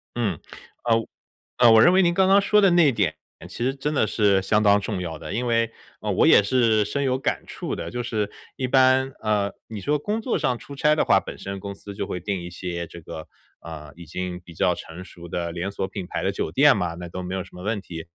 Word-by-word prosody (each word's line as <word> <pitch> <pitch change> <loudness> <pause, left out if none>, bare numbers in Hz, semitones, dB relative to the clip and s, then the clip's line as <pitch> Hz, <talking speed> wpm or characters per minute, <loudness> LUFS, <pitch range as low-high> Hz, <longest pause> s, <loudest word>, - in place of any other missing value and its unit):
嗯。 105 -9 -1 0.5
呃， 115 -1 +3
我 115 - -3 0.5
呃， 120 -2 +7
我 110 0 +7
认 175 - +6
为 190 +1 +5
您 175 0 +2
刚 190 0 +3
刚 200 +1 +6
说 210 +1 +3
的 195 -3 +5
那 175 -3 +5
一 135 - +2
点 95 -8 0 0.3
其 120 - -5
实 135 +1 0
真 145 +2 -3
的 125 - +2
是 100 -4 +2
相 105 +2 +2
当 100 -1 +5
重 100 -2 -3
要 85 -3 -4
的， - - -7
因 120 +2 -2
为， 115 -1 +1 0.3
嗯， - - -2
我 - - +4
也 - - +7
是 110 -1 +2
深 140 +7 -2
有 130 -1 +1
感 - - -2
触 - - -5
的。 - - -5
就 120 0 -3
是 105 -3 -2 0.3
一 130 - -1
般， 130 +1 +4
饿， 105 -2 0
你 110 -3 -6
说 150 +10 +1
工 210 +8 -2
作 245 - -1
上 125 -2 0
出 140 - -11
差 150 +2 +2
的 - - +2
话， 95 -1 +4
本 - - -9
身 100 0 -6
公 100 0 -6
司 100 0 -10
就 - - -3
会 90 - -4
定 95 0 -3
一 85 - -7
些 85 -1 -5
这 85 - -11
个， 80 0 -9 0.4
嗯， 75 -3 -9
已 85 -2 -11
经 90 +2 -5
比 85 -1 -14
较 90 +2 +2
成 85 +3 -9
熟 85 -2 -12
的 85 0 -3
连 90 +3 -3
锁 95 - -3
品 95 -1 -6
牌 - - -3
的 - - +1
酒 - - -3
店 140 - +5
嘛， 90 -4 -2
那 90 0 -8
都 90 +2 -6
没 90 +1 -5
有 95 - -3
什 95 - -17
么 90 - -10
问 105 0 -2
题。 85 -3 -8
105 Hz, 280 characters per minute, -24 LUFS, 90-130 Hz, 0.5 s, 呃